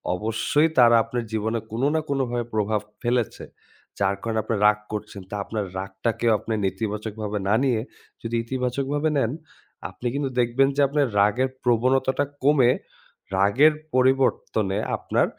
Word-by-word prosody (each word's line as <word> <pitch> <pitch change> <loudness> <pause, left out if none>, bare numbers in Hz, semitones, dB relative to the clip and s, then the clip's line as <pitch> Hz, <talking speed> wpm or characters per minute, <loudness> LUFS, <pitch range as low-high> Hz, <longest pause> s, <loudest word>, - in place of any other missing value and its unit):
অবশ্যই 115 - +1
তারা 120 -2 +7
আপনার 120 +1 -3
জীবনে 110 +1 -1
কোন 115 +2 -3
না 160 - +3
কোনভাবে 120 -4 -1
প্রভাব 105 0 0 0.2
ফেলেছে। 120 -1 -1 0.6
যার 100 0 +2
কারণে 115 -1 -1
আপনি 110 - -1
রাগ 105 0 +5
করছেন। 105 -1 -6
তা 105 - -5
আপনার 110 -2 -3
রাগটাকেও 100 +5 -1
আপনি 115 - -4
নেতিবাচকভাবে 105 +2 -3
না 100 - +3
নিয়ে 125 -5 +2 0.4
যদি 115 0 -3
ইতিবাচকভাবে 135 +5 -1
নেন, 115 -4 +1 0.6
আপনি 125 - -6
কিন্তু 140 -1 -1
দেখবেন 120 +3 +3
যে 145 - +2
আপনার 145 0 +1
রাগের 105 +6 +3
প্রবণতাটা 130 +3 +2 0.2
কমে 135 -4 +5 0.6
রাগের 110 +11 +4 0.2
পরিবর্তনে 130 -6 +2 0.2
আপনার - - +1
115 Hz, 135 wpm, -24 LUFS, 105-130 Hz, 0.6 s, তারা